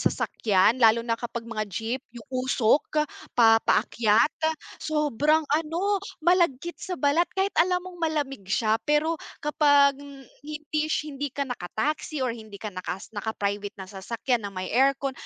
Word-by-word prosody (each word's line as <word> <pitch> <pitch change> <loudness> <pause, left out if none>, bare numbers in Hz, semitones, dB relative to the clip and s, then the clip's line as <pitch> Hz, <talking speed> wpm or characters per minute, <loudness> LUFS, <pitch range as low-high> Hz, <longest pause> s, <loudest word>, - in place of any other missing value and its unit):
sasakyan 215 +4 +2
lalo 230 0 +5
na 230 -1 -1
kapag 235 -1 -5
mga 215 -2 -4
jeep, 225 +6 -3 0.2
yung 230 - -9
usok, 260 +4 +2 0.3
pa 225 -1 +6
paakyat, 225 +4 +3 0.5
sobrang 300 0 +1
ano, 335 +6 0 0.2
malagkit 345 -3 +2
sa 365 -2 -4
balat 305 +4 +2
kahit 385 +1 +1
alam 360 +1 +3
mong 360 -1 -10
malamig 285 - -2
siya 220 +2 +1
pero 310 +2 +2 0.2
kapag 285 -2 +4
h 280 0 -14
hindi 305 0 -2
sh 305 -1 -2
hindi 280 +1 -3
ka 280 +2 -3
naka 245 -9 -6
taxi 300 +2 -1
or 245 - 0
hindi 220 -3 -10
ka 210 +1 -7
naka 185 0 -4 0.2
naka-private 205 -1 -3
na 190 - -7
sasakyan 210 +4 -2
ng 200 - -14
may 185 - -4
aircon, 275 +2 +2
270 Hz, 155 wpm, -26 LUFS, 220-305 Hz, 0.5 s, pa